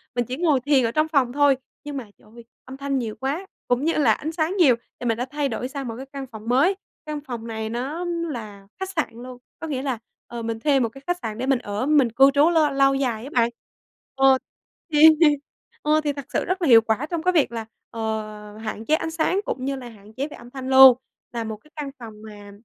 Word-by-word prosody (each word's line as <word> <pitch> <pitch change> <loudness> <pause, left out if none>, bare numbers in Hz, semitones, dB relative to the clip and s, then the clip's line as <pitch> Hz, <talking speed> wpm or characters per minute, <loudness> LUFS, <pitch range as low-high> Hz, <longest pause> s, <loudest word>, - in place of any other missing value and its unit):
mình 245 -1 0
chỉ 255 +4 -5
ngồi 315 -6 +3
thiền 275 0 +3
ở 230 - 0
trong 310 +3 +1
phòng 275 -6 +1
thôi. 285 -1 +4 0.3
Nhưng 290 -1 -5
mà 260 - -4
trời - - -23
ơi, 235 - -12 0.2
âm 265 +1 -9
thanh 275 0 -1
nhiều 220 -3 -4
quá 285 - -2 0.2
cũng 245 +4 +1
như 330 - +2
là 275 -7 +3
ánh 310 +7 -4
sáng 330 +4 -1
nhiều, 290 -10 +6 0.2
thì 245 - -6
mình 225 -1 +1
đã 245 - -2
thay 285 +1 -2
đổi 245 +2 -3
sang 270 -1 -6
một 230 - -4
cái 265 - -7
căn 270 0 -8
phòng 220 -2 -11
mới. 290 +11 +4 0.3
Căn 300 -1 -4
phòng 240 -5 -7
này 220 -1 -4
nó 275 +10 -3
là 240 - -5
khách 380 - -3
sạn 340 -5 -1 0.2
luôn, 255 -1 -9 0.2
có 325 - -5
nghĩa 265 -3 -2
là, 265 -4 -2 0.3
ờ, 235 -1 -6
mình 225 0 -3
thuê 275 +2 +3
một 235 - +1
cái 270 +4 -14
khách 355 0 0
sạn 215 0 -4
để 255 - -2
mình 270 -2 +2
ở, 205 +1 -3
mình 290 -5 +4
cư 270 +3 +6
trú 290 +4 +5
lâu 315 -3 +3
lâu 275 0 +4
dài 245 -5 -1
á 275 - -7
bạn. 235 -2 +3 0.7
Ờ, 270 0 +5 0.6
thì 300 +1 +7 0.8
ờ, 305 +1 +2
thì 290 - 0
thật 280 -2 -7
sự - - 0
rất 370 +1 -2
là 330 - +1
hiệu 230 -3 +8
quả 225 +6 -1
trong 335 -2 -3
cái 365 - +3
việc 310 -8 +3
là, 225 -1 -5 0.2
ờ, 215 -2 -5
hạn 220 0 -6
chế 310 - +3
ánh 320 0 -3
sáng 330 +4 +1
cũng 255 - -3
như 275 0 -1
là 250 -2 -8
hạn 210 -1 -16
chế 270 +5 -3
về 305 - -11
âm 240 +1 -13
thanh 260 -1 -6
luôn. 265 -2 +9 0.3
Là 235 -1 -3
một 220 -1 -5
cái 300 +8 -25
căn 290 -3 -5
phòng 225 -2 -9
mà 205 -1 -11
265 Hz, 255 wpm, -23 LUFS, 230-295 Hz, 0.8 s, luôn